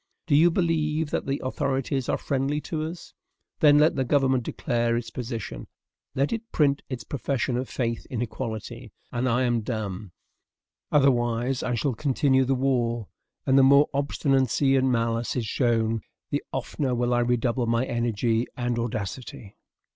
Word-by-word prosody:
Do 145 Hz, -, +2 dB
you 165 Hz, +4 st, +6 dB
believe 160 Hz, -3 st, 0 dB
that -, -, -2 dB
the 135 Hz, 0 st, -1 dB
authorities 135 Hz, 0 st, -1 dB
are -, -, +1 dB
friendly 140 Hz, +1 st, -1 dB
to 155 Hz, +2 st, -4 dB
us? 165 Hz, +2 st, -8 dB, 0.5 s
Then 145 Hz, -1 st, +6 dB
let 150 Hz, +2 st, +4 dB
the 135 Hz, -, +1 dB
government 130 Hz, 0 st, +2 dB
declare 115 Hz, 0 st, -1 dB
its 115 Hz, -1 st, -5 dB
position; 115 Hz, -, -5 dB, 0.5 s
let 140 Hz, +9 st, +1 dB
it 230 Hz, 0 st, -5 dB
print 140 Hz, -2 st, +2 dB
its 125 Hz, -5 st, -5 dB
profession 130 Hz, +1 st, -2 dB
of 125 Hz, +1 st, -2 dB
faith 115 Hz, -3 st, -2 dB
in 125 Hz, -, -3 dB
equality, 120 Hz, -1 st, -5 dB, 0.2 s
and 125 Hz, +1 st, 0 dB
I 125 Hz, +2 st, +2 dB
am 120 Hz, -2 st, +1 dB
dumb. 105 Hz, -4 st, -4 dB, 0.8 s
Otherwise, 125 Hz, -2 st, +2 dB
I 125 Hz, -, -1 dB
shall 130 Hz, +3 st, 0 dB
continue 135 Hz, +1 st, +2 dB
the 135 Hz, +1 st, +1 dB
war; 120 Hz, -4 st, 0 dB, 0.4 s
and 135 Hz, 0 st, +5 dB
the -, -, +7 dB
more 140 Hz, +2 st, +6 dB
obstinacy 135 Hz, -1 st, +2 dB
and 130 Hz, -1 st, +3 dB
malice 115 Hz, 0 st, 0 dB
is 125 Hz, -3 st, -1 dB
shown, 115 Hz, -1 st, +1 dB, 0.3 s
the -, -, 0 dB
oftener 130 Hz, -4 st, -2 dB
will 120 Hz, 0 st, +1 dB
I 120 Hz, -, +3 dB
redouble 120 Hz, 0 st, +1 dB
my 115 Hz, +2 st, +1 dB
energy 115 Hz, -1 st, 0 dB
and 120 Hz, -1 st, -1 dB
audacity. 110 Hz, -2 st, -5 dB
125 Hz, 160 wpm, -26 LUFS, 115-135 Hz, 0.8 s, the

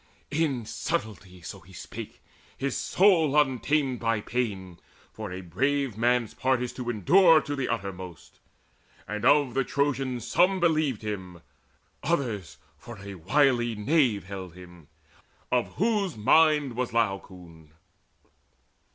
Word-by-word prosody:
In 145 Hz, -6 st, 0 dB
subtlety 100 Hz, -5 st, -4 dB
so -, -, -8 dB
he 95 Hz, +4 st, -18 dB
spake, -, -, -9 dB, 0.3 s
his 135 Hz, 0 st, -2 dB
soul 165 Hz, -7 st, +3 dB
untamed 135 Hz, -1 st, +1 dB
By 115 Hz, -1 st, 0 dB
pain; 100 Hz, -7 st, -4 dB, 0.3 s
for 110 Hz, -4 st, -7 dB
a 95 Hz, +1 st, -6 dB
brave 135 Hz, +8 st, -1 dB
man's 120 Hz, 0 st, +1 dB
part 130 Hz, -1 st, +1 dB
is 125 Hz, -, -5 dB
to 125 Hz, -2 st, -5 dB
endure 165 Hz, -, +5 dB
To 145 Hz, -, -4 dB
the 135 Hz, -2 st, -2 dB
uttermost. 95 Hz, -7 st, -6 dB, 0.7 s
And 105 Hz, +1 st, -4 dB
of 140 Hz, -1 st, +4 dB
the 135 Hz, -, +1 dB
Trojans 135 Hz, -3 st, -1 dB
some 185 Hz, +2 st, +3 dB
Believed 155 Hz, -, +1 dB
him, 95 Hz, -5 st, -6 dB, 0.6 s
others 120 Hz, -, -2 dB, 0.2 s
for 120 Hz, -2 st, -10 dB
a 100 Hz, 0 st, -9 dB
wily 120 Hz, -, +2 dB
knave 115 Hz, -, +2 dB
Held 95 Hz, -2 st, -8 dB
him, 90 Hz, -4 st, -14 dB, 0.6 s
of 125 Hz, -1 st, 0 dB
whose 205 Hz, -, 0 dB
mind 150 Hz, +2 st, +4 dB
was 125 Hz, 0 st, -2 dB
Laocoon. 90 Hz, -7 st, -3 dB
120 Hz, 125 wpm, -27 LUFS, 100-145 Hz, 0.7 s, endure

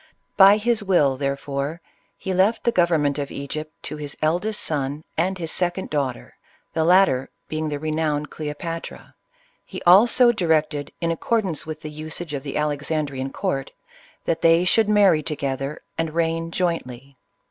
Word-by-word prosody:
By 200 Hz, +1 st, +8 dB
his 225 Hz, 0 st, 0 dB
will, 160 Hz, -9 st, +3 dB
there 140 Hz, +1 st, -1 dB
fore, 140 Hz, +3 st, -4 dB, 0.4 s
he 190 Hz, -, -3 dB
left 195 Hz, +5 st, +2 dB
the 235 Hz, -, +2 dB
government 160 Hz, -7 st, +2 dB
of 140 Hz, -1 st, -3 dB
Egypt 155 Hz, +2 st, -5 dB
to 150 Hz, -, -6 dB
his 145 Hz, -1 st, -7 dB
eldest 180 Hz, +8 st, 0 dB
son 145 Hz, 0 st, -2 dB
and 185 Hz, +4 st, 0 dB
his 165 Hz, -2 st, -4 dB
second 180 Hz, +1 st, -1 dB
daughter, 140 Hz, -5 st, -2 dB, 0.2 s
— -, -, -39 dB
the 160 Hz, -, +1 dB
latter 170 Hz, -7 st, +4 dB, 0.2 s
being 155 Hz, 0 st, -2 dB
the 145 Hz, -, -2 dB
re 155 Hz, +2 st, -3 dB
nowned 150 Hz, -1 st, -1 dB
Cleopatra. 160 Hz, +2 st, -6 dB, 0.5 s
He -, -, -8 dB
also 235 Hz, +7 st, +6 dB
directed, 155 Hz, -7 st, 0 dB
in 165 Hz, -1 st, +1 dB
accordance 185 Hz, -2 st, -1 dB
with 155 Hz, 0 st, -6 dB
the 155 Hz, -1 st, -7 dB
usage 155 Hz, +1 st, -5 dB
of 140 Hz, -, -3 dB
the 140 Hz, 0 st, -5 dB
Alexandrian 145 Hz, -2 st, -2 dB
court, 135 Hz, 0 st, -3 dB, 0.5 s
that 165 Hz, 0 st, -1 dB
they 165 Hz, +2 st, +5 dB
should 215 Hz, +3 st, +3 dB
marry 200 Hz, -7 st, +5 dB
together 140 Hz, -1 st, -4 dB, 0.2 s
and 165 Hz, -1 st, -2 dB
reign 165 Hz, 0 st, 0 dB
jointly. 140 Hz, -7 st, -3 dB
155 Hz, 160 wpm, -23 LUFS, 145-175 Hz, 0.5 s, By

